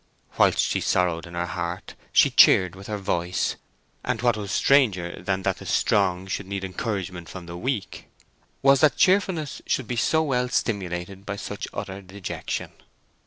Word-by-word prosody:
Whilst - - +5
she - - +1
sorrowed 85 -2 +1
in 85 - -10
her 85 0 -1
heart 85 +1 -5 0.2
she - - +5
cheered 90 -2 +6
with 95 +1 -11
her 105 - -3
voice, 90 -2 -1 0.5
and 125 -3 -1
what 120 -2 +3
was 100 -2 -5
stranger 105 -12 +2
than 95 -1 -1
that 95 -1 0
the - - -10
strong 95 -2 +2
should 95 0 -4
need 100 0 -4
encouragement 90 -3 -4
from 90 -2 -8
the 85 0 -8
weak 110 +2 -4 0.6
was 135 0 +5
that 155 - +4
cheerfulness 185 -5 +2
should 130 - 0
be 125 - -2
so 160 +6 +2
well 125 -4 0
stimulated 95 -4 -2
by 105 0 -4
such - - -6
utter 95 +1 -6
dejection. 95 0 -5
95 Hz, 165 wpm, -25 LUFS, 90-120 Hz, 0.6 s, cheered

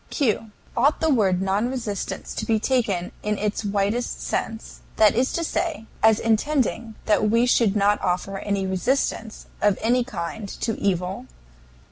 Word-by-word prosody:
Q. 225 -5 0 0.3
Ought 275 +6 +3
the 320 -1 +2
word 190 -6 +2
"non 200 +5 +1
resistance" 205 -7 -4
to 215 - -3
be 220 -1 +2
taken 210 -8 0
in 210 0 -1
its 210 +1 -2
widest 205 +4 -1
sense 225 0 -4 0.2
that 215 -2 +5
is 250 +3 +1
to 335 - -1
say, 325 -7 -2 0.2
as 220 -1 +5
intending 230 -1 0
that 215 0 +3
we 230 +2 +4
should 230 -4 +3
not 205 0 +3
offer 185 +2 -1
any 200 -1 -1
resistance 220 +3 -1 0.2
of 205 -2 +3
any 245 +2 +2
kind 205 -2 -5
to 225 -3 0
evil? 180 -6 -1
215 Hz, 155 wpm, -24 LUFS, 195-240 Hz, 0.3 s, that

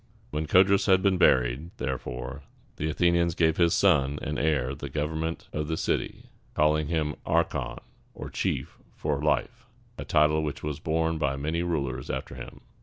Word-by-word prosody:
When 75 +1 -2
Codrus 95 +4 +4
had 95 0 +4
been 95 -2 +3
buried, 65 +5 +3
therefore, 65 +1 -4 0.4
the 75 - -1
Athenians 85 +1 +2
gave 80 -1 +2
his 85 -1 +4
son 75 -7 +3
and 75 -2 -2
heir 70 -4 +1
the 70 0 -7
government 80 +3 -3
of 75 0 -2
the 80 0 -2
city, - - -2 0.2
calling 75 0 +2
him 75 -2 0
archon, 85 +1 0 0.4
or - - -7
chief - - -2 0.2
for 75 -2 -2
life, 115 +11 -1 0.3
a - - -3
title 75 0 +3
which 75 -2 -4
was 75 0 -3
borne 80 +1 0
by 70 -2 0
many 75 +5 -2
rulers 70 -7 -2
after - - -4
him. 60 -1 -9
75 Hz, 165 wpm, -27 LUFS, 70-85 Hz, 0.4 s, Codrus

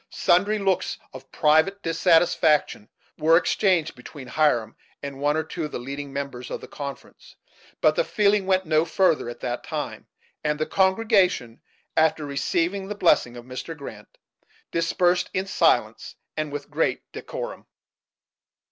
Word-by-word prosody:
Sundry 200 +5 +2
looks 190 -2 0 0.2
of 130 0 -12
private 160 +6 +2
dissatisfaction 165 - +2 0.3
were 165 +1 +5
exchanged 180 -3 +1
between 145 -4 -11
Hiram 145 -8 +1 0.3
and 140 -1 -6
one 145 +2 +1
or 160 - 0
two 160 +1 -5
of 150 - -7
the - - -4
leading 140 +3 -6
members 135 -3 -5
of - - -4
the - - -11
conference, 140 -1 -9 0.5
but - - +4
the - - +2
feeling 205 - +2
went 190 -1 +2
no 155 0 +3
further 165 -6 +1
at 120 - -9
that 120 -1 -3
time; - - -5 0.4
and 150 -1 0
the 155 - -1
congregation, 190 - +2 0.3
after 160 -1 +2
receiving 170 +7 -1
the 210 - -5
blessing 120 -10 +2
of 120 - -10
Mr. 130 +6 -7
Grant., 110 -7 -11 0.5
dispersed 175 +2 +1
in 185 +1 0
Silence, 190 - +1 0.2
and 155 -1 -3
with 145 +1 -6
great 155 +2 0
decorum. - - -7
160 Hz, 145 wpm, -24 LUFS, 140-185 Hz, 0.5 s, were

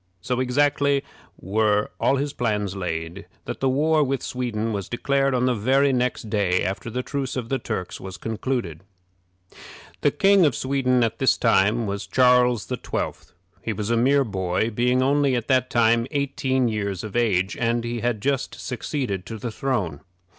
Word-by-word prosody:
So 125 +8 -2
exactly 140 +2 +2 0.4
were 105 +2 +1
all 135 - +3
his 140 +1 -2
plans 105 -5 -1
laid, 80 -3 -4 0.2
that - - -5
the 135 - +1
war 155 +3 +3
with 135 -2 -2
Sweden 115 -3 -2
was 100 -1 -4
declared 135 +2 +1
on 125 0 +1
the 130 - +2
very 135 +5 +2
next 125 -2 -1
day 100 -4 +1
after 95 +5 -3
the 125 +2 -3
truce 140 -2 -3
of 120 -3 -4
the 135 - 0
Turks 90 -5 -4
was 95 -1 -7
concluded. 115 -7 -3 1.2
The - - +4
King 195 -1 +4
of 145 -6 +3
Sweden 130 -2 +1
at 115 -1 -1
this 135 - +3
time 115 0 +3
was 100 0 -4
Charles 125 0 +3
XII. - - -2 0.5
He 115 - -2
was 105 +2 -3
a - - +3
mere 135 +4 +3
boy, 95 0 -1
being 125 +3 +2
only 140 -1 +2
at 120 -2 -2
that 130 -1 +3
time 115 0 +3
eighteen 135 -3 0
years 100 -4 -2
of 110 0 -7
age, 100 -5 +1
and 115 0 0
he 120 0 -3
had 115 -2 -1
just 140 -2 -1
succeeded 125 - -3
to 115 - -6
the 115 +2 -5
throne. 105 - -2
120 Hz, 175 wpm, -23 LUFS, 105-130 Hz, 1.2 s, The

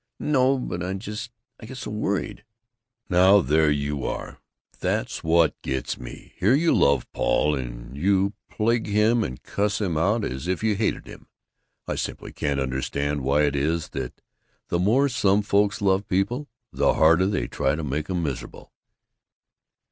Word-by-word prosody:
"No, 135 -2 +2
but 90 -9 -4
I 90 +2 -2
just 105 +3 -6 0.3
I 110 - -10
get 130 - -8
so 120 - -6
worried." 105 -1 -2 0.6
"Now, 95 +2 +6
there 75 +3 +3
you 70 -1 -1
are! - - -5 0.4
That's - - -2
what 80 0 +2
gets 65 -1 -3
me! - - -10
Here 105 +8 +4
you 165 +3 +3
love 70 0 +3
Paul, 75 - +1
and - - -6
yet 70 - -7
you 100 +1 +2 0.2
plague 115 +1 0
him 110 +3 +3
and 65 -7 -6
cuss 105 +1 -1
him 90 -7 -1
out 105 +6 +1
as 65 +6 -5
if 95 +2 -1
you 110 -1 +3
hated 105 +2 -1
him. - - -13 0.6
I - - -1
simply - - -5
can't 70 -1 -2
understand 70 +2 -2
why 70 +3 +2
it 70 -1 +1
is 75 +3 -1
that - - -6 0.5
the 85 - 0
more 120 +10 +3
some 105 -5 +2
folks 100 +1 +1
love 95 +1 +2
people, 120 +10 -1 0.3
the - - +2
harder 85 +4 +5
they 100 - -1
try 70 - 0
to 80 - -4
make 75 +3 -3
'em 90 -2 -1
miserable." 70 -5 -6
95 Hz, 170 wpm, -24 LUFS, 75-105 Hz, 0.6 s, Now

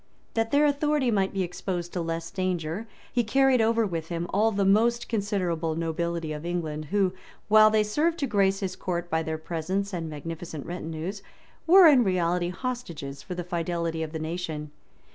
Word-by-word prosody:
That 225 0 0
their 290 +3 +4
authority 290 -3 +2
might 195 -3 +1
be 195 -1 -1
exposed 175 0 -4
to 180 - -1
less 165 0 -3
danger, 185 +1 -2 0.3
he 240 - +2
carried 265 +2 +3
over 225 0 +3
with 165 -5 -3
him 170 0 -3
all 215 +3 +4
the 200 -1 +1
most 235 +4 +3
considerable 185 -7 -1
nobility 165 -1 -2
of 150 0 -6
England, 160 -3 -3
who, 190 +2 +1 0.4
while 215 0 +8
they 215 0 +3
served 305 +11 +1
to 285 - 0
grace 195 -4 +2
his 185 -2 -2
court 175 -2 -3
by 160 0 +2
their 160 0 -3
presence 180 +5 -3
and 165 -3 -3
magnificent 160 0 -6
retinues, 175 +3 -5 0.5
were 370 +2 +9
in 280 -6 +7
reality 175 -2 +1
hostages 175 - -5
for 180 - -6
the 175 - -3
fidelity 170 -1 -2
of 160 -1 -3
the 160 - -4
nation. 155 -2 -4
180 Hz, 180 wpm, -27 LUFS, 165-215 Hz, 0.5 s, were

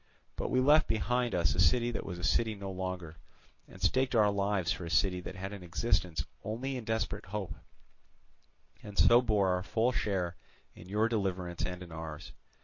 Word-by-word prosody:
But - - -3
we 130 - +2
left 150 +4 +5
behind 120 +2 0
us 85 - +2
a - - -4
city 120 +5 +4
that 115 - -3
was 90 -2 -5
a 90 - -8
city 110 +2 +2
no 100 -1 -6
longer, 90 -3 -5 0.5
and - - -14
staked 130 -1 +2
our 105 -2 +5
lives 100 -3 0
for 90 - -3
a 85 - -5
city 90 +1 +2
that 90 - -7
had 95 +2 -5
an 100 - -8
existence 90 -3 0 0.2
only 125 +6 -3
in 125 -3 -5
desperate 105 -3 -2
hope, 100 -1 -4 1.3
and 105 -1 -10
so 120 +1 +7
bore 105 -5 +2
our 90 0 +1
full 115 +6 +1
share 95 -7 -1 0.4
in 90 - -13
your 105 +3 +2
deliverance 95 -6 -2
and 90 0 -6
in 85 - -12
ours. 80 -2 -7
100 Hz, 190 wpm, -31 LUFS, 90-115 Hz, 1.3 s, so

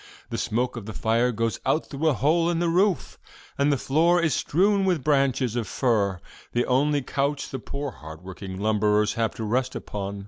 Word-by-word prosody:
The - - -2
smoke 120 +2 -1
of 110 -3 -7
the 110 - -5
fire 115 +2 +2
goes 115 -2 -1
out 155 - +1
through 150 +3 -2
a 150 - +3
hole 160 +8 +2
in 170 - 0
the 170 0 +1
roof, 185 +1 +1 0.4
and 140 +1 +2
the 140 - +2
floor 165 +7 +3
is 170 -3 +1
strewn 195 +5 +2
with 180 -7 +1
branches 135 -5 +1
of 115 -4 -2
fir, 100 -6 +1 0.3
the 120 0 +1
only 140 +2 +2
couch 140 +2 -1
the 130 - -4
poor 140 +3 -5
hardworking 95 +4 -9
lumberers 105 0 +2
have 115 -1 -1
to 115 - -5
rest 125 +4 -1
upon. 100 0 -5
130 Hz, 195 wpm, -25 LUFS, 110-150 Hz, 0.4 s, a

